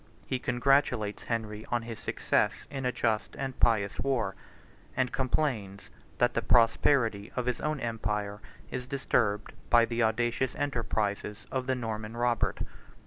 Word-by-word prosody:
He 130 Hz, -, -1 dB
congratulates 120 Hz, -5 st, +2 dB
Henry 110 Hz, -2 st, -3 dB
on 120 Hz, -1 st, 0 dB
his 115 Hz, -1 st, -7 dB
success 105 Hz, +1 st, 0 dB
in 135 Hz, -2 st, -2 dB
a -, -, +2 dB
just 110 Hz, -3 st, 0 dB
and 135 Hz, -2 st, -4 dB
pious 105 Hz, -4 st, +3 dB
war; 120 Hz, -8 st, 0 dB, 0.6 s
and 130 Hz, -2 st, +2 dB
complains 125 Hz, -7 st, -1 dB, 0.3 s
that -, -, +3 dB
the -, -, +1 dB
prosperity 115 Hz, -3 st, +3 dB
of 125 Hz, -, -1 dB
his 125 Hz, -1 st, -1 dB
own 150 Hz, -1 st, -1 dB
empire 105 Hz, -3 st, -2 dB, 0.3 s
is 125 Hz, -1 st, -4 dB
disturbed 115 Hz, -6 st, 0 dB, 0.2 s
by 120 Hz, -1 st, +6 dB
the 115 Hz, +1 st, -1 dB
audacious 120 Hz, +3 st, +1 dB
enterprises 110 Hz, -6 st, -2 dB
of 130 Hz, -1 st, -2 dB
the 130 Hz, -, +2 dB
Norman 110 Hz, -2 st, -4 dB
Robert. 120 Hz, -1 st, +1 dB
115 Hz, 140 wpm, -30 LUFS, 105-125 Hz, 0.6 s, by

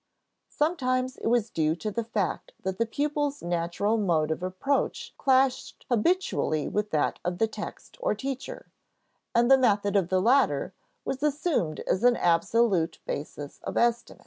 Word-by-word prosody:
Sometimes 255 Hz, -5 st, 0 dB
it -, -, -4 dB
was 235 Hz, -2 st, +2 dB
due 155 Hz, 0 st, +1 dB
to 210 Hz, +5 st, -4 dB
the 230 Hz, +3 st, -2 dB
fact 210 Hz, -6 st, -3 dB
that 190 Hz, 0 st, -3 dB
the 230 Hz, -, +1 dB
pupil's 290 Hz, +3 st, -1 dB
natural 175 Hz, +6 st, 0 dB
mode 160 Hz, -6 st, +1 dB
of 160 Hz, -, -2 dB
approach 185 Hz, +10 st, -1 dB
clashed 265 Hz, -1 st, +1 dB
habitually 240 Hz, -, +1 dB
with 210 Hz, 0 st, -1 dB
that 155 Hz, -5 st, 0 dB
of 175 Hz, 0 st, -2 dB
the 225 Hz, -, +3 dB
text 220 Hz, -, -8 dB
or -, -, +1 dB
teacher, 270 Hz, -1 st, -5 dB, 0.7 s
and 240 Hz, +2 st, +4 dB
the 270 Hz, -, +8 dB
method 205 Hz, -4 st, +2 dB
of 190 Hz, -4 st, +2 dB
the 185 Hz, -, +2 dB
latter 250 Hz, +8 st, +2 dB, 0.3 s
was 270 Hz, -, -3 dB
assumed 295 Hz, -, 0 dB
as 190 Hz, -, -1 dB
an 245 Hz, -1 st, +5 dB
absolute 175 Hz, +1 st, +2 dB
basis 145 Hz, 0 st, -6 dB
of -, -, -5 dB
estimate. 235 Hz, 0 st, +1 dB
225 Hz, 155 wpm, -27 LUFS, 180-265 Hz, 0.7 s, the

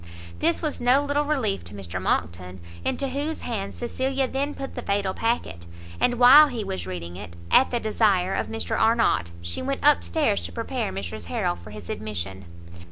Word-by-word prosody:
This 170 Hz, -, +1 dB
was 305 Hz, -5 st, -2 dB
no 255 Hz, +4 st, +4 dB
little 285 Hz, +1 st, +1 dB
relief 255 Hz, -10 st, 0 dB
to 100 Hz, -, -8 dB
Mr 90 Hz, -2 st, -5 dB
Monckton, 90 Hz, +1 st, -2 dB, 0.2 s
into 275 Hz, -, -1 dB
whose 290 Hz, +4 st, -3 dB
hands 200 Hz, -5 st, -4 dB
Cecilia 265 Hz, +2 st, -1 dB
then 280 Hz, +3 st, -2 dB
put 270 Hz, -, -6 dB
the 245 Hz, -, -5 dB
fatal 200 Hz, -3 st, 0 dB
packet; 85 Hz, -, -2 dB, 0.3 s
and 245 Hz, 0 st, +2 dB
while 265 Hz, +5 st, +9 dB
he 240 Hz, -6 st, -4 dB
was 95 Hz, -, -4 dB
reading 90 Hz, -1 st, -6 dB
it, 85 Hz, -4 st, -9 dB, 0.2 s
at 265 Hz, -, +6 dB
the 240 Hz, -, -1 dB
desire 205 Hz, -4 st, +2 dB
of -, -, -1 dB
Mr 225 Hz, 0 st, -3 dB
Arnott, 225 Hz, -, +2 dB
she 85 Hz, +1 st, -3 dB
went 85 Hz, -, -3 dB
up 85 Hz, -, +6 dB
stairs 85 Hz, 0 st, 0 dB
to -, -, -12 dB
prepare 85 Hz, -, -3 dB
Mrs 95 Hz, +1 st, -6 dB
Harrel 85 Hz, +1 st, -1 dB
for 85 Hz, +4 st, -13 dB
his 105 Hz, -4 st, -10 dB
admission. 95 Hz, -3 st, -5 dB
195 Hz, 185 wpm, -25 LUFS, -, 0.3 s, while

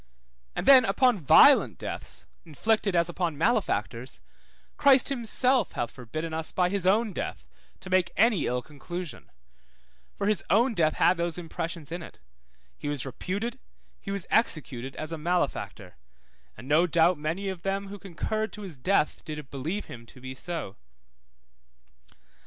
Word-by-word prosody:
And -, -, -3 dB
then 265 Hz, -1 st, +8 dB
upon 225 Hz, +2 st, +3 dB
violent 145 Hz, -, +6 dB
deaths -, -, -6 dB, 0.2 s
inflicted 200 Hz, +5 st, 0 dB
as 170 Hz, -1 st, +3 dB
upon 175 Hz, -3 st, -2 dB
malefactors, 225 Hz, +10 st, -1 dB, 0.5 s
Christ 275 Hz, -2 st, +5 dB
himself 255 Hz, 0 st, +1 dB
hath 120 Hz, -, -3 dB
forbidden 155 Hz, +6 st, -6 dB
us 160 Hz, 0 st, 0 dB
by 180 Hz, -1 st, +1 dB
his 195 Hz, -1 st, -1 dB
own 215 Hz, +2 st, +3 dB
death -, -, -5 dB, 0.4 s
to 185 Hz, -, -9 dB
make 185 Hz, -2 st, +2 dB
any 220 Hz, -6 st, +3 dB
ill 125 Hz, 0 st, -1 dB
conclusion; 170 Hz, +3 st, -8 dB, 0.9 s
for 200 Hz, -, -3 dB
his 210 Hz, -2 st, +1 dB
own 230 Hz, +5 st, +3 dB
death 160 Hz, -6 st, +2 dB
had 180 Hz, -, +3 dB
those 170 Hz, -1 st, -2 dB
impressions 165 Hz, -2 st, -5 dB
in 175 Hz, +1 st, -4 dB
it; -, -, -11 dB, 0.6 s
he -, -, -7 dB
was 145 Hz, -2 st, -2 dB
reputed, 205 Hz, -, -4 dB, 0.4 s
he -, -, -9 dB
was 195 Hz, -3 st, -3 dB
executed 135 Hz, -, 0 dB
as 155 Hz, +1 st, -3 dB
a 165 Hz, -, -4 dB
malefactor, 105 Hz, -, -2 dB, 0.6 s
and 130 Hz, -, -11 dB
no 155 Hz, +5 st, +4 dB
doubt 170 Hz, 0 st, +3 dB
many 165 Hz, +7 st, -3 dB
of 190 Hz, -3 st, -4 dB
them 195 Hz, +1 st, -2 dB
who 205 Hz, 0 st, -8 dB
concurred 215 Hz, +4 st, -3 dB
to 210 Hz, -, -8 dB
his 170 Hz, -9 st, -8 dB
death 185 Hz, 0 st, +1 dB
did 150 Hz, -3 st, -7 dB
believe 160 Hz, +10 st, -3 dB
him 115 Hz, -1 st, -11 dB
to 130 Hz, -, -15 dB
be 130 Hz, +1 st, -7 dB
so. 155 Hz, -, -6 dB
175 Hz, 155 wpm, -27 LUFS, 150-200 Hz, 0.9 s, then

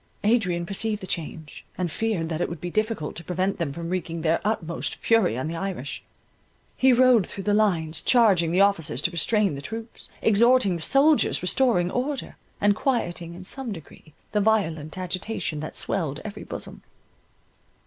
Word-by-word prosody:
Adrian 190 Hz, -6 st, +1 dB
perceived 210 Hz, +3 st, -1 dB
the 190 Hz, -, -7 dB
change, 160 Hz, -3 st, -5 dB
and 180 Hz, -3 st, -2 dB
feared 210 Hz, -6 st, -1 dB
that 160 Hz, 0 st, -3 dB
it -, -, 0 dB
would 170 Hz, -1 st, -6 dB
be 175 Hz, +2 st, -5 dB
difficult 215 Hz, -7 st, -1 dB
to 170 Hz, -, -7 dB
prevent 185 Hz, +3 st, -1 dB
them 165 Hz, -5 st, -1 dB
from 165 Hz, +3 st, -6 dB
wreaking 170 Hz, -3 st, -3 dB
their 165 Hz, 0 st, +2 dB
utmost 175 Hz, -6 st, -2 dB
fury 225 Hz, -, +2 dB
on 130 Hz, -, -2 dB
the 165 Hz, -, -4 dB
Irish. 175 Hz, -6 st, -4 dB, 0.7 s
He 260 Hz, 0 st, +4 dB
rode 250 Hz, -4 st, +5 dB
through 195 Hz, -, -7 dB
the 205 Hz, -, +1 dB
lines, 165 Hz, -7 st, +1 dB
charging 195 Hz, -9 st, +4 dB
the 180 Hz, +3 st, +3 dB
officers 200 Hz, -10 st, +2 dB
to 180 Hz, -, +2 dB
restrain 200 Hz, +2 st, +2 dB
the 140 Hz, -, -6 dB
troops, 225 Hz, +9 st, -7 dB
exhorting 225 Hz, -2 st, +4 dB
the 170 Hz, -, -5 dB
soldiers, 275 Hz, -, +3 dB
restoring 180 Hz, -4 st, +2 dB
order, 270 Hz, +3 st, -3 dB, 0.2 s
and 205 Hz, 0 st, +3 dB
quieting 175 Hz, -10 st, -2 dB
in 180 Hz, -, -9 dB
some 255 Hz, +5 st, -1 dB
degree 160 Hz, -3 st, -11 dB, 0.2 s
the 210 Hz, -, +1 dB
violent 165 Hz, -8 st, 0 dB
agitation 185 Hz, -2 st, -3 dB
that 155 Hz, -, -6 dB
swelled 160 Hz, -6 st, -2 dB
every 210 Hz, -, -7 dB
bosom. -, -, -7 dB
185 Hz, 170 wpm, -25 LUFS, 165-220 Hz, 0.7 s, rode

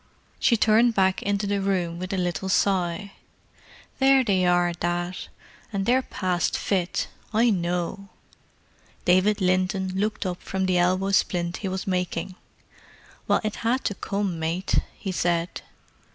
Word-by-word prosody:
She 235 Hz, -, +3 dB
turned 225 Hz, +2 st, +4 dB
back 190 Hz, -1 st, +2 dB
into 200 Hz, 0 st, -1 dB
the 200 Hz, 0 st, 0 dB
room 180 Hz, -4 st, -1 dB
with 185 Hz, +2 st, -5 dB
a 195 Hz, -, -1 dB
little 180 Hz, +1 st, -2 dB
sigh. 190 Hz, 0 st, +1 dB, 0.9 s
"There 270 Hz, 0 st, +5 dB
they 190 Hz, -5 st, +2 dB
are, 175 Hz, 0 st, +3 dB
Dad. 175 Hz, +1 st, -2 dB, 0.6 s
And 195 Hz, -2 st, -2 dB
they're 255 Hz, +4 st, +3 dB
passed 185 Hz, -7 st, -1 dB
fit—I 210 Hz, +4 st, 0 dB
know." 180 Hz, +1 st, -2 dB, 1.0 s
David 190 Hz, +4 st, +3 dB
Linton 185 Hz, +1 st, +1 dB
looked 210 Hz, +2 st, -1 dB
up 180 Hz, -1 st, -3 dB
from 190 Hz, 0 st, -2 dB
the 185 Hz, -1 st, +2 dB
elbow 185 Hz, +2 st, +2 dB
splint 175 Hz, -2 st, +1 dB
he 200 Hz, -, -4 dB
was 190 Hz, 0 st, -3 dB
making. 180 Hz, -1 st, -2 dB, 0.9 s
"Well, -, -, +3 dB
it 215 Hz, -1 st, -3 dB
had 245 Hz, +3 st, 0 dB
to -, -, 0 dB
come, 195 Hz, -3 st, -3 dB
mate," 165 Hz, +4 st, 0 dB, 0.2 s
he 195 Hz, -, -4 dB
said. 175 Hz, -1 st, -1 dB
190 Hz, 140 wpm, -25 LUFS, 180-205 Hz, 1.0 s, There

